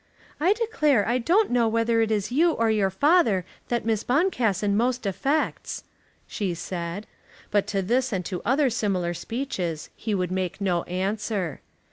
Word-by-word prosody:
"I 355 Hz, +7 st, +4 dB
declare 305 Hz, -, +1 dB
I 240 Hz, +2 st, +2 dB
don't 365 Hz, -, +2 dB
know 240 Hz, -2 st, +3 dB
whether 230 Hz, +1 st, +2 dB
it 225 Hz, -, +1 dB
is 210 Hz, 0 st, -1 dB
you 325 Hz, +6 st, +3 dB
or 230 Hz, -4 st, +1 dB
your 205 Hz, -3 st, +2 dB
father 225 Hz, -, +3 dB, 0.2 s
that 240 Hz, -2 st, -1 dB
Miss 225 Hz, -2 st, 0 dB
Boncassen 235 Hz, -, +1 dB
most 245 Hz, +2 st, 0 dB
affects," 275 Hz, +10 st, -1 dB, 0.4 s
she 190 Hz, -5 st, -3 dB
said. 175 Hz, +3 st, -5 dB, 0.5 s
But 205 Hz, -1 st, +2 dB
to 195 Hz, -1 st, -1 dB
this 250 Hz, +6 st, +1 dB
and 185 Hz, -4 st, -2 dB
to 180 Hz, 0 st, -4 dB
other 265 Hz, +1 st, +2 dB
similar 185 Hz, -6 st, 0 dB
speeches 180 Hz, -, -4 dB
he 215 Hz, -2 st, -2 dB
would 180 Hz, -2 st, -1 dB
make 185 Hz, 0 st, -2 dB
no 180 Hz, -4 st, +1 dB
answer. 195 Hz, -, -2 dB
220 Hz, 160 wpm, -25 LUFS, 190-255 Hz, 0.5 s, I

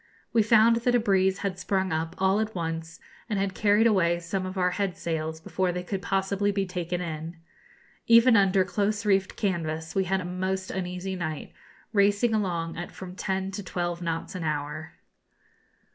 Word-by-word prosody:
We 230 Hz, -, +5 dB
found 225 Hz, +1 st, +5 dB
that 245 Hz, +1 st, +1 dB
a -, -, +5 dB
breeze 190 Hz, -3 st, +2 dB
had 190 Hz, -2 st, -2 dB
sprung 190 Hz, 0 st, 0 dB
up 160 Hz, +2 st, -2 dB
all 190 Hz, +2 st, +2 dB
at 220 Hz, -1 st, -2 dB
once, 165 Hz, -1 st, -4 dB, 0.3 s
and 210 Hz, -, 0 dB
had 195 Hz, -1 st, 0 dB
carried 210 Hz, +3 st, +3 dB
away 170 Hz, -6 st, +3 dB
some 185 Hz, +2 st, -3 dB
of 185 Hz, +1 st, -6 dB
our 180 Hz, -1 st, +2 dB
head 195 Hz, -2 st, -2 dB
sails 160 Hz, -1 st, -3 dB
before 185 Hz, +3 st, -1 dB
they 180 Hz, 0 st, -4 dB
could 190 Hz, +1 st, -3 dB
possibly 195 Hz, +2 st, 0 dB
be 195 Hz, -1 st, 0 dB
taken 180 Hz, -1 st, -3 dB
in. 165 Hz, 0 st, -5 dB, 0.7 s
Even 230 Hz, +1 st, +7 dB
under 195 Hz, -2 st, +4 dB
close 205 Hz, +3 st, -1 dB
reefed 195 Hz, -2 st, +2 dB
canvas 160 Hz, -5 st, -2 dB
we 190 Hz, -1 st, +1 dB
had 190 Hz, +1 st, +1 dB
a 180 Hz, -, -5 dB
most 185 Hz, +1 st, -2 dB
uneasy 185 Hz, 0 st, -3 dB
night, 155 Hz, -4 st, -5 dB, 0.4 s
racing 205 Hz, +3 st, +3 dB
along 170 Hz, -6 st, -1 dB
at 175 Hz, -, -6 dB
from 185 Hz, -1 st, -9 dB
ten 190 Hz, 0 st, -2 dB
to 195 Hz, -, -5 dB
twelve 175 Hz, -1 st, -3 dB
knots 165 Hz, -1 st, -3 dB
an 185 Hz, -2 st, -5 dB
hour. 150 Hz, 0 st, -3 dB
185 Hz, 180 wpm, -27 LUFS, 170-200 Hz, 0.7 s, Even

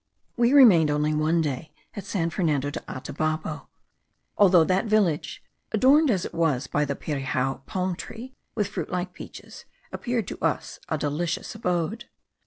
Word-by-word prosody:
We 240 Hz, 0 st, +3 dB
remained 210 Hz, -, +7 dB
only 150 Hz, +1 st, +1 dB
one 155 Hz, +2 st, +2 dB
day 150 Hz, +1 st, -4 dB, 0.2 s
at 200 Hz, -, -7 dB
San 170 Hz, -4 st, -1 dB
Fernando 150 Hz, -5 st, 0 dB
de -, -, -4 dB
Atabapo, 155 Hz, +3 st, -3 dB, 0.7 s
although 185 Hz, -4 st, +6 dB
that 185 Hz, +5 st, +1 dB
village, 205 Hz, -8 st, +1 dB, 0.3 s
adorned 275 Hz, +7 st, +5 dB
as 195 Hz, -7 st, +1 dB
it -, -, -7 dB
was 150 Hz, -6 st, +1 dB
by 150 Hz, 0 st, 0 dB
the 140 Hz, -1 st, -3 dB
pirijao 135 Hz, -2 st, -2 dB
palm 185 Hz, -1 st, -2 dB
tree, 240 Hz, +8 st, -9 dB, 0.2 s
with 210 Hz, -3 st, 0 dB
fruit -, -, -5 dB
like 180 Hz, 0 st, -3 dB
peaches, -, -, -11 dB, 0.3 s
appeared 240 Hz, -5 st, -2 dB
to -, -, -8 dB
us -, -, -1 dB
a -, -, 0 dB
delicious 155 Hz, +4 st, -2 dB
abode. 185 Hz, +1 st, -2 dB
170 Hz, 155 wpm, -25 LUFS, 150-205 Hz, 0.7 s, remained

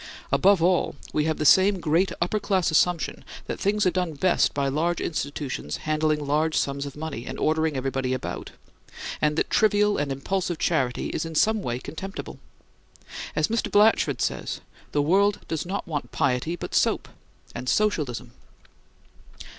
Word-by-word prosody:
Above 195 Hz, -3 st, +4 dB
all, 180 Hz, 0 st, +2 dB, 0.2 s
we 150 Hz, -, +1 dB
have 160 Hz, -1 st, 0 dB
the 150 Hz, -, -2 dB
same 190 Hz, +5 st, +6 dB
great 170 Hz, +3 st, +2 dB
upperclass 190 Hz, -2 st, 0 dB
assumption 170 Hz, 0 st, +1 dB, 0.2 s
that -, -, -5 dB
things 205 Hz, +1 st, +1 dB
are 180 Hz, -, +4 dB
done 180 Hz, -3 st, -1 dB
best 180 Hz, +5 st, +2 dB
by 140 Hz, -1 st, -1 dB
large 160 Hz, +5 st, 0 dB
institutions 145 Hz, -, -3 dB
handling 155 Hz, -1 st, +1 dB
large 155 Hz, +3 st, +1 dB
sums 140 Hz, 0 st, -1 dB
of 140 Hz, -, -9 dB
money 150 Hz, -6 st, -5 dB
and -, -, -5 dB
ordering 160 Hz, -2 st, +1 dB
everybody 130 Hz, -1 st, -1 dB
about; 130 Hz, -, -4 dB, 0.7 s
and 150 Hz, 0 st, +2 dB
that -, -, -1 dB
trivial 210 Hz, -1 st, +3 dB
and 145 Hz, -1 st, -1 dB
impulsive 175 Hz, +5 st, -2 dB
charity 130 Hz, -8 st, 0 dB
is -, -, -2 dB
in 165 Hz, -1 st, -6 dB
some 220 Hz, +6 st, +3 dB
way 120 Hz, -8 st, -2 dB
contemptible. 190 Hz, +9 st, -7 dB, 1.0 s
As -, -, +2 dB
Mr. 230 Hz, 0 st, -1 dB
Blatchford 210 Hz, +2 st, +4 dB
says, -, -, -2 dB, 0.3 s
"The 145 Hz, -, +1 dB
world 200 Hz, +6 st, +3 dB
does 160 Hz, +1 st, -3 dB
not 195 Hz, +2 st, -3 dB
want 150 Hz, -3 st, -4 dB
piety, 140 Hz, +5 st, 0 dB
but -, -, -7 dB
soap -, -, +2 dB, 0.5 s
and 125 Hz, +1 st, -4 dB
Socialism." 140 Hz, -, 0 dB
160 Hz, 155 wpm, -25 LUFS, 140-190 Hz, 1.0 s, same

